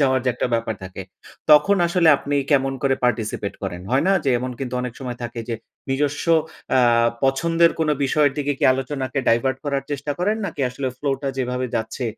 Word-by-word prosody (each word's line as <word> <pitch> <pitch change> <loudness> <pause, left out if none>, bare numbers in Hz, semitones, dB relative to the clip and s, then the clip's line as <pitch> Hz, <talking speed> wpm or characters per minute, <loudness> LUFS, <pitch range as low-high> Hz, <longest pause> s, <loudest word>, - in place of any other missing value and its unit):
যাওয়ার 130 -2 +3
যে - - +2
একটা - - -1
ব্যাপার 115 -1 -1
থাকে, 95 +1 -7 0.5
তখন 150 +7 +6
আসলে 170 -1 +3
আপনি 145 +1 -2
কেমন 135 -2 +3
করে 135 -1 +3
participate 110 -4 -1
করেন, 90 -2 -4
হয় 135 +4 +2
না? 195 - +5
যে - - +1
এমন 125 +1 -4
কিন্তু 130 -2 -4
অনেক 125 -2 -4
সময় 125 -2 -5
থাকে 120 0 -5
যে 115 - -1 0.4
নিজস্ব 145 +1 0 0.5
আ - - +5 0.5
পছন্দের 165 +5 +3
কোনো 150 -1 +2
বিষয়ের 145 +1 +2
দিকে 145 0 0
কি - - 0
আলোচনাকে 135 0 -3
divert 130 +3 +2
করার 140 -2 -1
চেষ্টা 145 +1 -2
করেন? 210 +5 +1
নাকি 155 -5 -6
আসলে 130 +2 -4
flow 140 -1 0
টা 135 - -1
যেভাবে 125 0 -1
যাচ্ছে, 110 +3 -3
135 Hz, 190 wpm, -22 LUFS, 125-145 Hz, 0.5 s, তখন